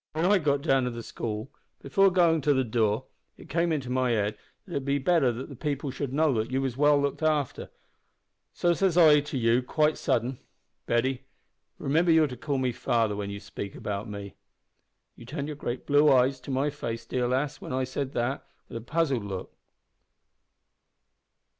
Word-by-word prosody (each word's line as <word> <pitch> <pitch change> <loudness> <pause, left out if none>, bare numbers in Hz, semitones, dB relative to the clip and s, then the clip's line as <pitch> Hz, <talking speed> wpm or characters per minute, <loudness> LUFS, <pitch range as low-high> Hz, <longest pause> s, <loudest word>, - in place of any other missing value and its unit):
When 160 +2 0
I 200 +1 +4
got 140 -3 0
down 135 -5 +2
to - - 0
the 115 -1 -7
school, 110 +4 -5 0.3
before 195 +8 +3
goin' 175 -3 +4
up 150 - -5
to 145 -1 +4
the 130 - +2
door 110 -3 0 0.3
it - - -14
came 170 0 +1
into 135 -5 -2
my 130 0 +1
head 105 -2 0 0.3
that 190 - -14
it - - -4
would 135 - -4
be 140 0 +1
better 145 -2 +3
that 120 +3 -6
the 140 - -10
people 140 0 -3
should 135 0 -4
know 145 -4 +2
you 130 +5 -1
was 135 -3 -2
well 145 +1 +4
looked 140 +2 -1
after, 150 -4 0 0.8
so 175 0 +1
says 180 -1 +1
I 155 -4 +7
to 145 -1 -4
you, 115 +1 +3
quite 150 +4 +1
sudden, 120 +2 0 0.5
`Betty, 125 +2 +1 0.6
remember 165 +5 +1
you're 160 -1 +5
to 130 -4 -5
call 145 0 -2
me 130 -1 0
father 115 -4 0
when 100 -1 -4
you 100 0 -6
speak 100 -1 -7
about 105 +1 -4
me.' 100 -1 -7 0.8
You 120 - -13
turned 145 +1 -4
your 150 - -5
great 125 -3 -5
blue 145 +1 +5
eyes 130 +1 +3
to 125 - -12
my 135 +2 0
face, 115 -5 -5
dear 125 -1 -1
lass, 135 +3 -1
when - - -7
I 130 0 0
said 130 +1 -4
that, 120 +3 -1 0.3
with - - -6
a - - -6
puzzled 140 -2 0
look. 95 -2 -6
135 Hz, 195 wpm, -27 LUFS, 120-150 Hz, 0.8 s, I